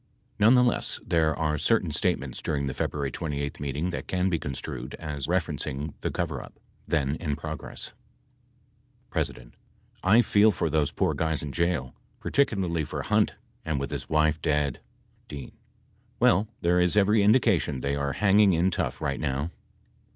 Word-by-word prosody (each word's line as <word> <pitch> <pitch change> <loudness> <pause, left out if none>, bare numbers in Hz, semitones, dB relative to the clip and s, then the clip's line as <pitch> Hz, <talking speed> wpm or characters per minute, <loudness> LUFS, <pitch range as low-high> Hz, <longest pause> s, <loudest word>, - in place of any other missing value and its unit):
Nonetheless, 125 +3 +4
there 80 -3 +2
are 75 -2 0
certain - - +2
statements - - -1
during 70 -3 -1
the 65 - -2
February 70 0 -2
28th 70 -2 -4
meeting 70 +5 -2
that - - -5
can 95 0 0
be 85 - +1
construed 65 -2 -5
as 75 -4 -5
referenc 85 -4 -1
ing 70 +3 -4
the - - -1
coverup - - -4 0.3
then 70 -2 +1
in 75 -4 -2
progress: 75 +1 -6 1.2
P. - - +2 0.8
I 110 +6 +5
feel 105 +1 +5
for 85 -5 -1
those 75 -2 +1
poor - - 0
guys 80 -2 -1
in 75 - -4
jail, 85 -6 -1 0.3
particularly 95 - +1
for 75 - -4
Hunt - - +2 0.3
and 80 -3 -1
with 70 - -4
his - - -5
wife 75 0 +2
dead. 75 -3 0 0.5
D. 70 -2 -8 0.7
Well 100 +5 +4
there 90 +1 +3
is 90 +2 +3
every 105 +1 +4
indication 100 - +3
they 70 +2 -1
are 70 -1 -1
hanging 100 -1 +4
in 85 +3 +2
tough - - -2
light 70 -2 -1
now. 70 +2 -2
80 Hz, 155 wpm, -27 LUFS, 70-90 Hz, 1.2 s, I